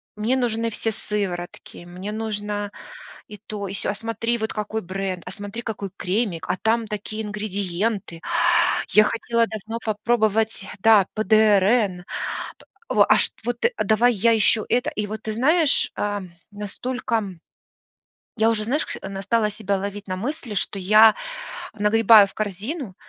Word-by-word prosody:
Мне 220 +5 0
нужны 230 -2 0
все 225 0 -2
сыворотки, 185 -5 -5
мне 185 +4 -7
нужна 210 -1 -3 0.6
и 210 - -9
то, 205 -1 -6
и 195 - -5
се, - - -2
а - - 0
смотри, 230 +2 -2
вот 220 0 -2
какой 215 +1 -3
бренд, 185 -1 -4
а 180 - -6
смотри, 205 +2 -7
какой 205 -4 -5
кремик, 185 -2 -2
а - - 0
там 225 0 +1
такие 215 +1 -5
ингредиенты, 205 -2 -3 0.7
я 215 - +6
хотела 230 +1 +1
давно 220 +1 -6
попробовать, 220 -1 +1
да, 215 -2 +6
ПДРН, 210 -2 +3 0.9
п - - -2
в - - +6
а, - - +4
шт - - +2
вот 240 0 -2
ты, 485 - +2
а - - 0
давай 235 +3 +3
я 225 +3 +3
еще 220 0 +3
это. 245 +1 +1
И 210 -1 -3
вот 215 +1 -6
ты 220 - -3
знаешь, 295 +6 +3
ам, 205 -3 -3 0.2
настолько, 225 +4 -3
м, 195 -6 -4 1.0
я 220 +1 +4
уже, 215 -2 -1
знаешь 275 +8 0
кш - - -5
на, 195 0 -5
стала 210 +2 +1
себя 200 -1 -2
ловить 200 +1 -5
на 185 - -2
мысли, 240 +1 -4
что 200 - -1
я 215 +3 +6 0.6
нагребаю 215 0 +6
в - - -13
корзину, 215 - -4
215 Hz, 160 wpm, -23 LUFS, 200-225 Hz, 1.0 s, я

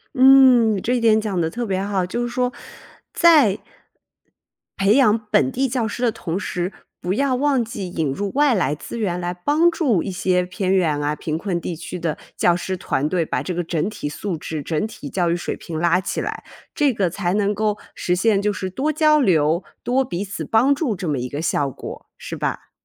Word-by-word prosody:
嗯， 255 -6 +6
这 245 - 0
一 - - +1
点 220 -2 +4
讲 205 -4 -2
得 160 -1 0
特 240 +7 -4
别 190 -3 -1
好， 195 -3 0
就 210 +7 -3
是 240 - -1
说， 250 +1 -1 0.6
在 300 - +5 1.2
培 195 +3 +3
养 230 -6 +5
本 130 -1 +3
地 270 +1 0
教 235 -3 -1
师 240 +4 -5
的 235 - +3
同 185 -6 -4
时， 180 -1 -3 0.3
不 180 - -2
要 275 +3 +1
忘 275 -1 +2
记 205 -5 -6
引 160 -5 -1
入 200 +9 -3
外 290 -1 +3
来 150 - +1
资 195 - -8
源 180 -5 -1
来 175 0 -3
帮 295 - +2
助 260 - +1
一 195 - -4
些 180 0 +1
偏 185 +1 -2
远 155 -6 +1
啊、 145 +1 -1
贫 155 +1 -3
困 175 -1 -2
地 170 - -4
区 175 +2 -6
的 165 -3 -2 0.2
教 175 - +3
师 185 +1 -3
团 150 -5 -1
队 170 0 0
把 125 - -2
这 180 +7 -4
个 175 0 -2
整 165 +2 -1
体 145 - -5
素 175 +3 -4
质、 155 0 -5
整 155 +5 -1
体 180 -9 -8
教 175 0 0
育 - - +1
水 175 - -3
平 160 -2 -6
拉 170 +2 +3
起 - - -3
来， - - -4 0.3
这 290 -3 +2
个 195 -5 0
才 180 0 -2
能 205 0 +1
够 210 0 0 0.2
实 180 - -1
现 200 +2 +2
就 210 +1 +1
是 190 -1 -4
多 270 +11 -1
交 305 0 +4
流、 165 - +2 0.2
多 260 +2 +1
彼 190 -5 -4
此 200 - -5
帮 250 +6 +3
助 275 -6 -1
这 180 -1 -5
么 150 -3 0
一 125 +1 -4
个 145 +3 -4
效 145 -3 0
果， - - -9
是 - - -7
吧？ - - -4
195 Hz, 235 characters per minute, -21 LUFS, 175-240 Hz, 1.2 s, 嗯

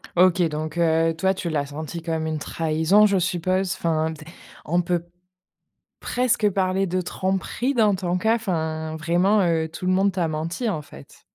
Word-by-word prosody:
OK, 180 0 +4
donc 155 +1 -3
heu, 165 -1 +2
toi, 190 +3 +2
tu 180 -2 -4
l'as 145 -3 -1
senti 155 +3 -7
comme 160 -1 -2
une 155 -1 -2
trahison, 160 +7 +2
je 200 -1 +1
suppose. 185 +1 0
Enfin, 160 -2 -1
tu 155 0 -11
es - - -17 0.4
on 175 +3 0
peut 175 -1 -1 0.9
presque 240 -4 +1
parler 190 0 0
de 185 +1 -1
tromperie 190 - -2
dans 215 -4 +4
ton 180 -1 -1
cas, 220 +4 +2
enfin. 160 -7 -3
Vraiment, 175 +6 +2
heu, 160 -1 +1
tout 160 +3 -7
le 185 - +2
monde 195 +1 +3
t'a 175 -3 -1
menti, 165 +9 -3
en 155 -8 -1
fait. 70 - -15
175 Hz, 180 wpm, -23 LUFS, 160-190 Hz, 0.9 s, OK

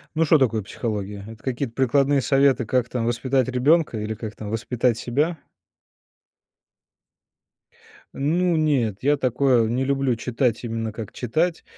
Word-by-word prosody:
Ну, 165 +1 +2
что 160 +1 +5
такое 115 -6 +1
психология? 105 -1 -5
Это 110 0 -11
какие-то 130 -1 -3
прикладные 135 +2 +2
советы, 135 -2 +3
как 120 +1 0
там 120 -2 -2
воспитать 125 +2 0
ребенка 130 +2 +2
или 105 +1 -3
как 110 0 -7
там 105 - -7
воспитать 115 +1 0
себя? 150 +9 -1 2.8
Ну, 170 +5 +1
нет, 135 -10 +1
я 145 +2 +4
такое 125 -3 +2
не 125 +3 0
люблю 135 -3 0
читать, 120 0 -1
именно 115 -1 -3
как 110 -1 -8
читать. 160 +8 -1
125 Hz, 140 wpm, -23 LUFS, 115-140 Hz, 2.8 s, что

